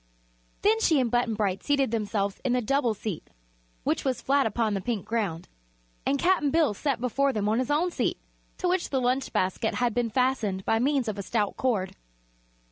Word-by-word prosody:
Then 435 +2 +4
she 320 -9 +3
and 245 -3 0
Button 240 -2 +1
Bright 200 -3 -1
seated 275 -4 +1
themselves 205 -3 -1
in 250 - +1
the 250 - +2
double 245 -2 +1
seat, 200 -5 -5 0.5
which - - 0
was 260 -3 0
flat 275 -2 +2
upon 220 0 0
the 195 - -1
pink 225 -2 -3
ground, 200 -8 -2 0.6
and 280 - +2
Cap'n 345 -3 +2
Bill 315 -5 +3
sat 275 +4 -1
before 270 +3 +1
them 210 -4 -1
on 220 +3 +2
his 255 - -1
own 325 +5 +2
seat, - - -1 0.4
to 365 - -1
which 360 0 0
the 270 - 0
lunch 255 +2 0
basket 190 +5 0
had 245 -2 +1
been 240 0 0
fastened 220 -6 0
by 225 - +2
means 270 0 +1
of 210 -2 -3
a - - -1
stout 205 +1 -1
cord. 215 -8 -1
240 Hz, 200 wpm, -27 LUFS, 210-275 Hz, 0.6 s, Then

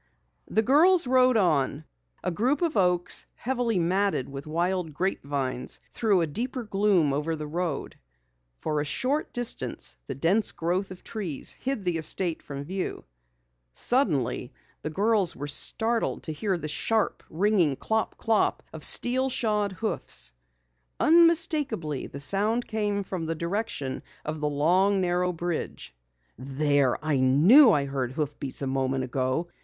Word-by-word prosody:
The 220 - +1
girls 330 +8 +5
rode 255 -1 +4
on. 155 -5 +1 0.4
A - - -1
group 255 - 0
of 330 -6 0
oaks, 180 -3 +3
heavily 245 -4 -1
matted 180 -4 +1
with 140 +2 -8
wild 170 0 -1
grapevines, 140 -8 -2
threw 205 -6 +2
a - - +2
deeper 240 - -4
gloom 195 -8 +2
over 150 +3 -1
the 155 -1 -6
road. 165 -1 -3 0.6
For 150 - -2
a - - -1
short 260 - -1
distance 145 - -2
the - - -4
dense 185 - +1
growth 180 +4 -1
of 185 -1 -11
trees 185 - -4
hid 260 -7 -4
the 175 -2 0
estate 165 +1 0
from 140 -1 -7
view. 185 +5 -4 0.7
Suddenly 145 - 0 0.3
the - - -4
girls 200 +2 +2
were 145 - -5
startled 225 +10 0
to 160 - -3
hear 190 +4 -1
the 155 - -5
sharp, 215 +8 0
ringing 180 -4 +2
clop 220 +9 -2
clop 225 -2 +1
of 160 -1 -8
steel 260 +2 +3
shod 210 -5 0
hoofs. 220 +4 -3 0.7
Unmistakably, 305 - +3
the 140 - -9
sound 210 +10 +2
came 205 -2 -1
from 185 -3 -5
the 165 - -2
direction 170 - -3 0.2
of 155 0 -4
the 150 - 0
long, 180 +7 +2
narrow 180 0 +1
bridge. 170 - -4 0.5
"There! 140 0 +1
I 155 -3 +1
knew 175 - +7
I 145 -6 +2
heard 135 -2 -3
hoofbeats 145 -2 -4
a - - 0
moment 135 0 -1
ago!" 130 +5 -1
180 Hz, 145 wpm, -26 LUFS, 145-220 Hz, 0.7 s, knew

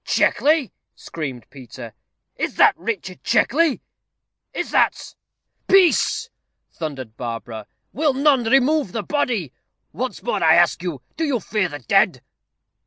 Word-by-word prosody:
"Checkley!" 300 -4 +2 0.2
screamed 135 -7 -7
Peter. 120 -4 -11 0.4
"Is - - -3
that - - +5
Richard 190 -1 -5
Checkley? 305 +1 +2 0.7
is - - -4
that - - +1 0.3
" - - -52
"Peace!" 380 -3 +3 0.4
thundered 135 -8 -7
Barbara; 115 -3 -6 0.3
"will 290 0 +1
none 275 -3 +3
remove 270 - +2
the 225 - -3
body? 225 - -2 0.4
Once 245 +2 -5
more 240 - -1
I 160 0 +6
ask 175 -1 +3
you, 165 -8 -5
do 325 - -1
you 280 -6 0
fear 205 -3 -1
the 145 - -6
dead?" 125 - +1
200 Hz, 130 wpm, -21 LUFS, -, 0.7 s, I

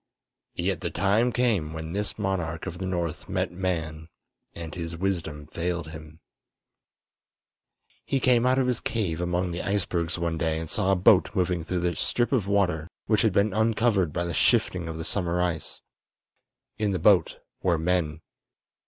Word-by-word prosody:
Yet - - -1
the - - -1
time 110 +5 +2
came 105 -12 +1
when 80 0 -5
this 105 +1 -3
monarch 90 -6 -2
of 85 - -6
the 95 - -3
north 85 -4 -3
met - - -1
man, 80 -4 -3 0.5
and 80 -2 -7
his 85 -1 -5
wisdom 85 -5 -2
failed 85 0 -3
him. 80 0 -11 1.8
He 135 - 0
came 125 -2 +4
out 130 +1 +3
of 135 - +3
his 125 -1 0
cave 90 -8 -2
among 90 +1 0
the 85 - -3
icebergs 90 -3 -1
one 85 -1 -2
day 80 -1 0
and 80 0 -4
saw 95 +3 +1
a - - +4
boat 90 +1 +5
moving 90 -3 +1
through 90 +2 -2
the 85 0 0
strip 120 0 0
of 115 -8 +1
water 90 -5 +1 0.2
which 110 - +2
had 110 - +3
been 100 +2 +2
uncovered 110 -5 +2
by 85 +3 -2
the 85 - -3
shifting 85 +1 +2
of 80 -1 -5
the 80 - -5
summer 90 -3 -1
ice. 85 -3 -2 1.0
In 105 -2 +1
the - - +1
boat 90 -1 +4 0.2
were 90 -3 +2
men. 80 -2 0
90 Hz, 170 wpm, -26 LUFS, 80-100 Hz, 1.8 s, boat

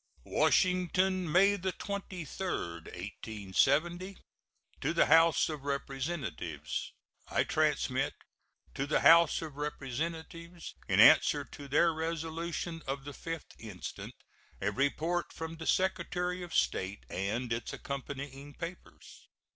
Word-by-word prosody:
WASHINGTON, 185 -1 +2
May 195 +4 +5
23, 190 -1 -4
1870. 130 - -1 0.6
To - - 0
the - - +5
House 165 +2 +5
of 150 -3 -5
Representatives: 135 - -3 0.4
I - - +2
transmit - - +1 0.6
to 135 - -2
the 150 - +2
House 165 -1 +6
of 150 -3 -8
Representatives, 160 +4 -5
in - - +2
answer - - +7
to 145 - -10
their 165 +4 +4
resolution 165 +1 -3
of 135 0 -3
the 145 - -5
5th 165 +3 -6
instant, 105 -5 -7 0.4
a 100 +1 0
report 155 - 0
from 160 0 -6
the 160 - -6
Secretary 180 -1 0
of 175 -1 -7
State 95 +2 0
and 115 +6 -2
its 115 -1 -4
accompanying 140 +1 -6
papers. 170 +1 -9
160 Hz, 110 wpm, -32 LUFS, 135-175 Hz, 0.6 s, answer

